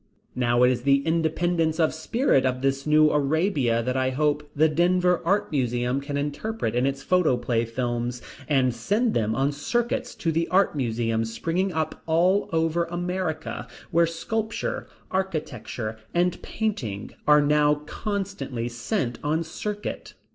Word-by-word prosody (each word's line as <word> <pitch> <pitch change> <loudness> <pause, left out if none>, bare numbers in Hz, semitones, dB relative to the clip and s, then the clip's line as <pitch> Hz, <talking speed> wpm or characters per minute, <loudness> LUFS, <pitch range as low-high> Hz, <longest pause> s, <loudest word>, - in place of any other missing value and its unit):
Now 120 0 +2
it 125 - +6
is 125 -1 -1
the 140 +1 +3
independence 165 0 +1
of 160 -2 +3
Spirit 160 - +1
of 130 0 -1
this 135 +1 0
New 150 0 +5
Arabia 145 - +1
that 125 +2 -1
I 130 0 +1
hope 150 +2 0
the 155 +2 +5
Denver 180 +3 +2
Art 195 +3 +1
Museum 125 -1 0
can 140 0 -4
interpret 145 - -2
in 125 +2 +2
its 135 0 -3
photoplay 125 -10 +2
films, 120 +1 -2 0.3
and 130 -4 +2
send 210 - 0
them 110 0 0
on 135 +3 +1
circuits 240 - -2
to 165 - -1
the 165 +1 0
Art 190 -3 +3
Museums 115 -3 -1
springing 175 +10 -1
up 160 -2 -3
all 180 +5 +3
over 165 +1 +1
America, 175 -2 -3 0.2
where 170 -1 +4
sculpture, 220 +7 -3 0.2
architecture, 135 - -3 0.2
and 175 0 +1
painting 125 - -3 0.2
are 150 0 +7
now 150 0 +4
constantly 190 - -3
sent 120 - -2
on 155 +3 +1
circuit. 205 +5 -5
150 Hz, 145 wpm, -25 LUFS, 125-175 Hz, 0.3 s, are